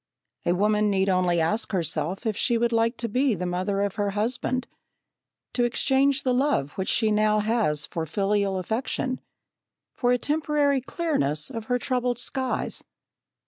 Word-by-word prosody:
A 175 - +4
woman 210 +2 +2
need 195 -1 +2
only 180 -2 +2
ask 210 +8 0
herself 180 - -2
if 220 -2 0
she 235 +2 +1
would 235 +1 +1
like 230 +1 +1
to 235 - -3
be 250 +2 +1
the 180 0 -3
mother 185 +3 -1
of 200 -2 -3
her 205 -1 +1
husband 250 +3 -1 0.9
to 245 - +1
exchange 270 +4 +2
the 255 - +2
love 250 - +1
which 190 +3 -3
she 220 -2 +2
now 215 0 +3
has 210 -9 +1
for 165 -1 -4
filial 200 +2 0
affection 250 +6 -2 0.7
for 245 -1 +1
a 250 - +4
temporary 295 -1 +1
clearness 155 - -1
of 225 -1 -5
her 245 +2 +1
troubled 250 -1 -1
skies. 260 +1 -2
220 Hz, 160 wpm, -25 LUFS, 190-250 Hz, 0.9 s, A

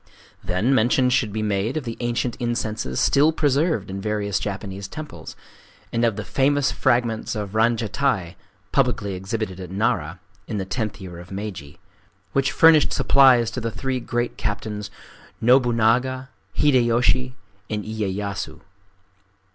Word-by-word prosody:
Then 95 +8 +1
mention 125 +1 +3
should 120 -4 +1
be 110 +1 -2
made 105 +6 -1
of 155 - -2
the 115 -2 -5
ancient 120 0 -1
incenses 110 - -2
still 145 +3 +4
preserved 145 - +1
in 95 +1 -5
various 105 -1 -1
Japanese 100 -1 -5
temples, 155 +8 -9 0.6
and 115 0 +1
of 115 -3 +2
the 105 0 -5
famous 140 +1 +2
fragments 120 -4 0
of 105 -2 -4
ranjatai 110 -4 0 0.4
(publicly 120 -7 +1
exhibited 95 0 -4
at 90 -2 -7
Nara 95 -4 -1 0.3
in 110 - -3
the 95 - -2
tenth 105 0 -3
year 90 -3 -9
of 90 - -12
Meiji) 95 -8 -6 0.6
which 135 0 +2
furnished 160 -2 +6
supplies 130 -4 +5
to 125 - -4
the 115 - -2
three 130 +3 -3
great 120 0 -2
captains, 105 -1 -3 0.5
Nobunaga, 125 +2 +3 0.3
Hideyoshi, 125 -1 +3 0.3
and 105 -1 -3
Iyeyasu. 100 -6 -4
110 Hz, 135 wpm, -23 LUFS, 100-125 Hz, 0.6 s, furnished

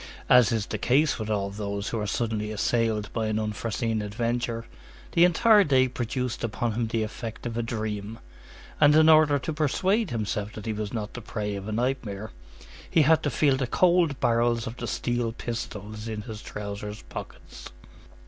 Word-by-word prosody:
As 125 -4 +6
is 110 -3 0
the 110 - -4
case 140 +6 +2
with 110 0 -4
all 100 -2 -1
those 100 0 -4
who 115 - -2
are 105 - -2
suddenly 110 -1 -2
assailed 110 -1 0
by 110 -2 -1
an 110 0 0
unforeseen 110 +1 -2
adventure, 115 +2 -2 0.5
the 170 - +4
entire 205 +4 +5
day 130 -5 +3
produced 125 0 -3
upon 115 +1 -1
him 115 +1 -1
the 110 0 -1
effect 110 +2 -6
of 115 -1 -3
a 120 - 0
dream, 110 -2 -4 0.6
and 150 0 +6
in 155 0 +6
order 155 -2 +6
to 150 +4 -4
persuade 185 - +1
himself 105 -2 -3
that 110 - -8
he 110 - -1
was 105 -1 -4
not 105 -3 -4
the 120 - -7
prey 105 -2 -4
of 100 0 -6
a - - -3
nightmare, 110 -3 -2 0.6
he 160 - +4
had 160 +2 +4
to 145 - 0
feel 135 +2 +2
the 130 -2 -1
cold 170 -1 +3
barrels 115 0 +2
of 115 - -5
the - - -4
steel 120 -2 -1
pistols 110 -2 -6
in 110 -2 -4
his 110 -1 -8
trousers 105 0 -6
pockets. - - -9
115 Hz, 185 wpm, -26 LUFS, 105-130 Hz, 0.6 s, As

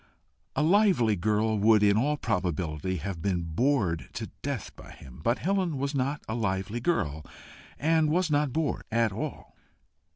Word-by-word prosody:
A - - +2
lively 175 - +4
girl 110 +3 +1
would 105 0 +5
in 100 -1 +5
all 145 +7 +1
probability 90 - -2
have 90 0 -5
been 90 -2 0
bored 90 - 0
to - - -6
death - - -4
by - - -13
him, 65 +2 -13
but 120 +6 +2
Helen 185 -4 0
was 140 +2 -2
not 140 +2 -1
a 110 - -3
lively 105 0 -2
girl, 80 - -1 0.5
and 160 0 +2
was 165 0 +1
not 145 -2 +2
bored 160 +2 -1
at 115 -1 +2
all. 100 - -6
115 Hz, 160 wpm, -28 LUFS, 95-150 Hz, 0.5 s, would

